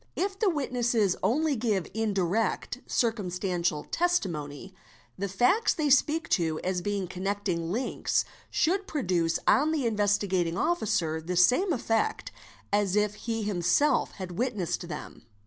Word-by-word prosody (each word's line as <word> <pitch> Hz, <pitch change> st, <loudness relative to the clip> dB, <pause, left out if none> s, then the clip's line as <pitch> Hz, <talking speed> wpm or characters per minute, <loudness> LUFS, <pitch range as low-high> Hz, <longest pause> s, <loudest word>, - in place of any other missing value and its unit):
If 390 Hz, +1 st, -2 dB
the 425 Hz, -, +3 dB
witnesses 240 Hz, -, +1 dB
only 285 Hz, +9 st, +1 dB
give 215 Hz, -6 st, 0 dB
indirect 215 Hz, +2 st, -1 dB
circumstantial 180 Hz, -8 st, -1 dB
testimony, 185 Hz, -, -2 dB, 0.4 s
the 200 Hz, +1 st, -3 dB
facts 245 Hz, -, +2 dB
they 300 Hz, -3 st, 0 dB
speak 305 Hz, +4 st, +3 dB
to 160 Hz, -4 st, +1 dB
as 185 Hz, -1 st, -1 dB
being 200 Hz, 0 st, -2 dB
connecting 185 Hz, -2 st, -2 dB
links 240 Hz, +7 st, 0 dB, 0.2 s
should 385 Hz, +4 st, +1 dB
produce 180 Hz, -, 0 dB
on 300 Hz, +3 st, +4 dB
the 310 Hz, -4 st, 0 dB
© -, -, -1 dB
Investigating 200 Hz, -5 st, +1 dB
Officer 185 Hz, -, 0 dB
the 180 Hz, +3 st, -4 dB
same 250 Hz, -, +4 dB
effect 260 Hz, -, -1 dB, 0.4 s
as 205 Hz, -2 st, +2 dB
if 210 Hz, 0 st, +2 dB
he 225 Hz, +1 st, -3 dB
himself 200 Hz, -, +2 dB
had 180 Hz, -3 st, -7 dB
witnessed 230 Hz, -9 st, -2 dB
them. -, -, -8 dB
205 Hz, 130 wpm, -28 LUFS, 180-260 Hz, 0.4 s, on